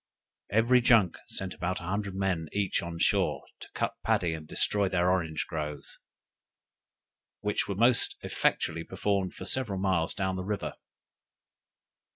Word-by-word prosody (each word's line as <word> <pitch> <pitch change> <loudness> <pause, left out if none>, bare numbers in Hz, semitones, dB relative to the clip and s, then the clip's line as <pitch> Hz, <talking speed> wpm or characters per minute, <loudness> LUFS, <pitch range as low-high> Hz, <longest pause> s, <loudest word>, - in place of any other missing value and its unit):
Every 120 +4 +4
junk 115 -8 +4
sent 95 -1 -4
about 90 0 -2
a - - -10
hundred 100 +2 -3
men 95 -5 -1
each 100 -2 0
on 85 -1 -6
shore, - - +1 0.2
to - - -10
cut - - -1
paddy, 85 -2 +1
and 80 -1 -7
destroy 100 +3 +1
their 90 0 +2
orange 85 -4 -1
groves, 75 -3 -5 1.4
which 105 0 0
was 100 - -3
most 120 +2 +4
effectually - - 0
performed 100 -2 -1
for - - -7
several 120 -7 +1
miles 95 -3 +1
down 95 -1 -1
the 95 - -3
river. 100 +1 -3
95 Hz, 145 wpm, -29 LUFS, 85-105 Hz, 1.4 s, Every